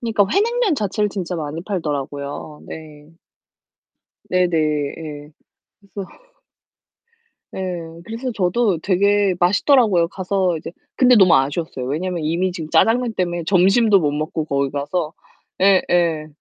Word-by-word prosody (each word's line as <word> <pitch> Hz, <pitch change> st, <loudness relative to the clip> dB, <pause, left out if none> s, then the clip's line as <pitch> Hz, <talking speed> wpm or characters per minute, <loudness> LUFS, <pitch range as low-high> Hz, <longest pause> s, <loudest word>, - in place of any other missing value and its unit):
그러니까 225 Hz, -4 st, +1 dB
회냉면 455 Hz, -2 st, +2 dB
자체를 210 Hz, -3 st, -1 dB
진짜 185 Hz, -3 st, -4 dB
많이 155 Hz, 0 st, -5 dB
팔더라고요. 145 Hz, -5 st, -4 dB
네. 150 Hz, -2 st, -11 dB, 1.2 s
네네. 180 Hz, -2 st, +1 dB, 0.4 s
예. 150 Hz, -2 st, -8 dB, 0.6 s
그래서 195 Hz, -2 st, -6 dB, 1.4 s
네. -, -, -6 dB, 0.4 s
그래서 235 Hz, +4 st, -5 dB
저도 195 Hz, -1 st, +1 dB
되게 200 Hz, +2 st, +2 dB
맛있더라고요 195 Hz, -, +3 dB
가서 185 Hz, -1 st, -1 dB
이제 -, -, -8 dB, 0.3 s
근데 255 Hz, -1 st, +5 dB
너무 190 Hz, -5 st, +6 dB
아쉬웠어요. 140 Hz, 0 st, -2 dB
왜냐면 170 Hz, +4 st, -3 dB
이미 170 Hz, +4 st, 0 dB
지금 165 Hz, -3 st, -6 dB
짜장면 230 Hz, +8 st, +3 dB
때문에 175 Hz, -3 st, -2 dB
점심도 195 Hz, +4 st, +4 dB
못 150 Hz, -3 st, +1 dB
먹고 155 Hz, +1 st, -3 dB
거기 140 Hz, -2 st, 0 dB
가서 150 Hz, +3 st, -3 dB, 0.5 s
예예. 175 Hz, -5 st, +2 dB
180 Hz, 285 characters per minute, -20 LUFS, 155-205 Hz, 1.4 s, 너무